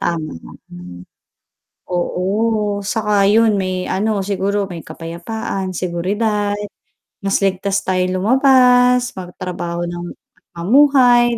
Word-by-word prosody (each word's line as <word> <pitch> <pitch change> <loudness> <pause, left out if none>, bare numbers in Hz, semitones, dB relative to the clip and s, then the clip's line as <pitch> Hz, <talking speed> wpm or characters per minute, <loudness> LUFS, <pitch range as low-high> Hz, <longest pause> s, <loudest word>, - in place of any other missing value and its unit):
tama, 165 -3 -2 0.4
hmm. 90 0 -11 0.9
Oo, 180 0 -2 0.7
saka 215 -2 -1 0.2
'yun 220 +1 +4
may 185 -1 -2
ano 210 +2 0
siguro 200 +1 -1
may 170 -4 -8
kapayapaan, 175 +4 -5
seguridad, 205 +4 -1 0.6
mas 195 -1 +1
ligtas 195 +1 -1
tayong 185 0 0
lumabas, 250 +2 +4
magtrabaho 175 -1 -5
ng 175 0 -6 0.5
mamuhay, 245 +3 +4
195 Hz, 95 wpm, -18 LUFS, 180-225 Hz, 0.9 s, yun